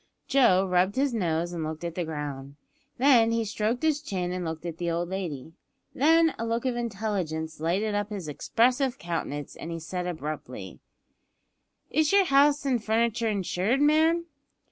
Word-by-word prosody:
Joe 215 -9 +4
rubbed 185 +1 +2
his 270 -1 +1
nose 175 -4 -1
and 165 -2 -3
looked 155 +1 -5
at 170 -1 -3
the 175 - -2
ground; 145 -3 -6 0.4
then 245 -4 +5
he 230 -1 0
stroked 220 +4 -1
his 305 -2 +2
chin 185 -9 -3
and 180 0 -3
looked 160 0 -5
at 165 -1 -5
the 175 -1 -1
old 170 +1 -1
lady; 165 -6 -5 0.4
then 325 +3 +4
a - - -2
look 230 +2 -1
of 255 -2 0
intelligence 195 -9 -3
lighted 190 +7 0
up 205 0 -1
his 200 -6 -5
expressive 250 - +1
countenance 165 - -4
as 165 - -7
he 165 0 -4
said 180 +3 -4
abruptly 150 - -6 1.1
"Is 310 0 +2
yer 395 0 +6
house 285 -2 +4
an' 255 -3 +2
furniture 225 +1 0
insured, 200 +4 0
ma'am?" 315 +3 +3
200 Hz, 165 wpm, -27 LUFS, 165-250 Hz, 1.1 s, yer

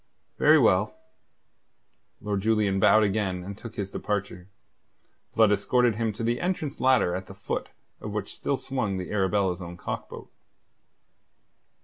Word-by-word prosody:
"Very - - +6
well." - - +3 1.3
Lord 105 -2 -2
Julian 105 -2 +2
bowed 110 +3 +5
again 95 -3 -1
and 100 +2 -7
took 115 +2 -10
his 100 -1 -4
departure. 95 -3 -4 0.9
Blood 110 -2 +5
escorted 115 +4 +2
him 115 -1 0
to 115 +3 -6
the 120 +1 0
entrance 170 -6 -2
ladder 130 -9 +3
at 95 +1 -4
the 95 - -11
foot 95 - -4 0.3
of 105 - -6
which 105 -1 -4
still 140 - -2
swung 120 -9 -2
the 90 -1 -5
Arabella's 95 -2 +1
own 85 0 -8
cock - - -5
boat. - - -10
105 Hz, 145 wpm, -26 LUFS, 95-115 Hz, 1.3 s, Very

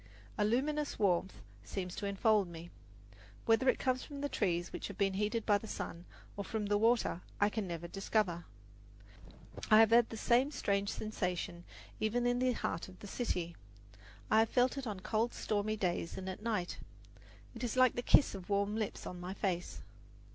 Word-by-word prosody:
A - - +1
luminous 285 +7 0
warmth 190 -3 +1 0.2
seems 180 - -5
to 200 - -2
enfold 200 0 +3
me. 170 0 -9 0.7
Whether 230 +3 +4
it - - +3
comes 255 -1 0
from 285 -2 -8
the 285 - -1
trees 175 -7 -1
which - - -4
have 200 - -9
been 195 -1 +2
heated 210 +3 -1
by 205 -2 +4
the 220 - -9
sun, 175 -4 -5 0.3
or 200 - -3
from 215 +1 -3
the 205 0 +2
water, 225 -5 +2 0.2
I 205 - +4
can 210 -2 -3
never 170 -1 -5
discover. 190 -2 -1 1.2
I 215 0 +8
have 225 0 +6
had 235 0 +6
the 225 - -6
same 245 +5 +3
strange 200 -8 0
sensation 180 -5 -3 0.3
even 240 +3 +1
in 245 0 +2
the 255 0 +2
heart 165 -7 -3
of 185 -1 -13
the - - -11
city. 180 -6 -2 0.8
I 220 - +6
have 225 0 +3
felt 250 +1 +3
it 275 -3 -4
on 200 -3 -4
cold, 225 +4 0
stormy 215 +1 -1
days 175 -3 -1
and 190 0 -5
at 185 - -6
night. 210 -6 -2 0.7
It 235 0 -7
is 245 +1 -2
like 255 -1 +6
the 245 - -2
kiss 270 - +5
of 190 -2 -8
warm 200 +1 +1
lips 220 -2 -3
on 180 - -6
my 180 +2 -5
face. 180 -4 -2
210 Hz, 190 wpm, -34 LUFS, 185-230 Hz, 1.2 s, I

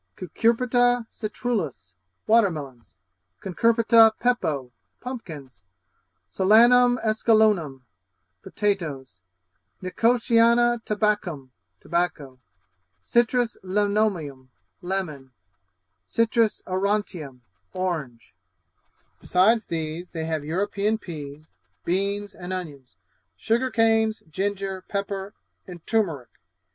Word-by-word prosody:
Cucurbita 240 - +1
citrullus 210 - -4 0.3
Water 225 -2 +4
melons 135 - -9 0.4
Cucurbita 225 +3 +4
pepo 155 - -1 0.3
Pumpkins. 155 - -9 0.6
Solanum 240 +5 +5
esculenlum 215 - +2 0.6
Potatoes. 150 - -3 0.6
Nicotiana 235 +3 +3
tabaccum 205 -11 -1 0.3
Tobacco. 155 -6 -3 0.6
Citrus 240 0 +1
lemoneum 190 -9 -1 0.3
Lemon. 155 -9 -4 0.7
aurantium 200 - -1 0.3
Orange. 155 -13 -4 0.9
Besides 220 +5 +2
these 165 +1 -5
they 160 -2 -5
have 160 -2 -2
European 200 +6 -1
peas, 150 -6 -9 0.4
beans, 200 +3 -1
and 180 0 -8
onions; 150 -9 -7 0.4
sugar 240 +4 0
canes, 225 -2 +2
ginger, 195 +1 -3
pepper, 200 0 -4 0.3
and 175 -3 -11
turmeric. 170 - -1
195 Hz, 75 wpm, -24 LUFS, 155-225 Hz, 0.9 s, Solanum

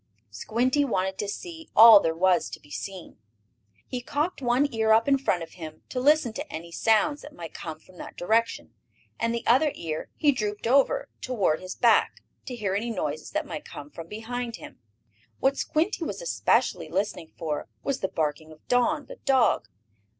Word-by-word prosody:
Squinty 245 - +1
wanted 190 -7 -1
to 205 - -2
see 325 - -7
all 225 -1 +10
there 165 -3 -1
was 180 0 +2
to - - -8
be 145 - -20
seen. 190 +1 -7 0.7
He 250 - -5
cocked 295 +6 -2
one 250 +3 +2
ear 220 -1 +2
up 225 +3 +4
in 275 -1 +4
front 180 -10 0
of 165 - -10
him, 160 -3 -10
to 255 - -3
listen 285 -3 +3
to 290 +6 -6
any 170 +2 -7
sounds 235 - +2
that 295 - -12
might 165 -2 -8
come 160 -1 -7
from 180 +2 -20
that - - -9
direction, 225 +5 0 0.5
and 230 0 +1
the 235 0 -3
other 275 +5 +4
ear 155 -2 -5
he 295 - +3
drooped 210 -5 -3
over 280 - +3
toward 205 -11 0
his 185 0 -6
back, 235 -2 +3 0.2
to 250 - -4
hear 205 -5 -2
any 215 +4 -1
noises 155 -8 -3
that - - -2
might 155 -3 -6
come 145 0 -10
from 165 -1 -9
behind 230 +3 -5
him. - - -12 0.6
What 270 +1 +2
Squinty 335 +5 -1
was - - -4
especially - - +1
listening 180 -5 -2
for 155 -3 -3 0.2
was 275 - -1
the 190 - -1
barking 155 -1 -3
of 155 - -17
Don, 290 +5 +2
the - - -11
dog. 260 - +2
225 Hz, 185 wpm, -26 LUFS, 175-270 Hz, 0.7 s, all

